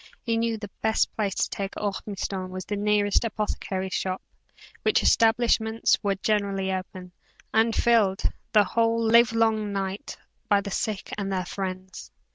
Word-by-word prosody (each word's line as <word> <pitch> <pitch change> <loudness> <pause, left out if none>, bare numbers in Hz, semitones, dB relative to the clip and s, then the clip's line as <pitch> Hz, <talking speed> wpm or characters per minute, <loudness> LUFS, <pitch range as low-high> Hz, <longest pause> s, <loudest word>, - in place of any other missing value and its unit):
He 230 -2 0
knew 230 0 0
the 205 -2 -8
best 220 0 +1
place 205 -3 -1
to - - 0
take 195 0 -4
Ormiston 195 -2 -3
was 185 0 -6
to 205 - -3
the 200 - -4
nearest 205 0 +2
apothecary's 195 -4 -3
shop, 185 +3 -1 0.6
which - - +2
establishments 225 -1 +3
were 200 -2 0
generally 195 -1 0
open, 185 -1 -6 0.4
and 225 +1 +3
filled, 215 -5 +3 0.3
the 210 -2 +6
whole 230 +4 +1
livelong 225 -2 +3
night, 195 0 -4 0.3
by 205 -1 +4
the 200 - -6
sick 210 -1 -3
and 195 -1 -2
their 185 -1 -1
friends. 185 0 -6
205 Hz, 150 wpm, -26 LUFS, 190-220 Hz, 0.6 s, the